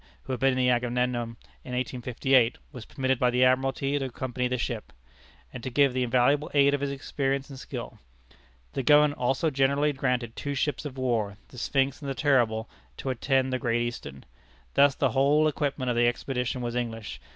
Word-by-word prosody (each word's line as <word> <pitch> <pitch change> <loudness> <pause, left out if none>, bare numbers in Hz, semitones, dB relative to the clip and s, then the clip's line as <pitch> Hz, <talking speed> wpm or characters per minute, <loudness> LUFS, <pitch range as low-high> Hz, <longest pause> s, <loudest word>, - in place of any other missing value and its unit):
who 130 - -4
had 125 - -3
been 135 +1 +3
in - - -2
the 125 -1 +2
Agamemnon 120 -1 -1 0.3
in 125 - -5
1858, 125 0 +1
was 125 -5 -9
permitted 130 -2 -1
by 125 - +3
the 125 +1 +2
Admiralty 135 +2 +2
to 135 - -2
accompany 125 0 -3
the 125 0 -1
ship, 120 -2 -4 0.6
and 125 - -7
to 130 - -4
give 140 +1 +3
the 130 - 0
invaluable 130 +4 +2
aid 140 0 +5
of 145 - 0
his 140 - -1
experience 135 0 -2
and 135 - -9
skill. - - -7 0.7
The - - -1
government 150 +2 +4
also 135 +6 +1
generously 140 +2 +2
granted 125 -3 -1
two 140 -1 -4
ships 150 +2 -1
of 135 -2 -6
war, 115 -6 -1
the 125 - -10
Sphinx 135 +3 0
and 140 - -5
the 135 - -3
Terrible, 120 -6 +2 0.3
to 135 - -3
attend 130 +1 +1
the 130 - 0
Great 120 0 0
Eastern. 70 - -6 0.5
Thus 140 -1 +5
the 135 -4 +1
whole 145 +5 +3
equipment 140 -4 -1
of - - -1
the 120 0 +4
expedition 125 +1 -2
was 120 -1 -3
English. 115 -3 -4
130 Hz, 195 wpm, -27 LUFS, 120-140 Hz, 0.7 s, aid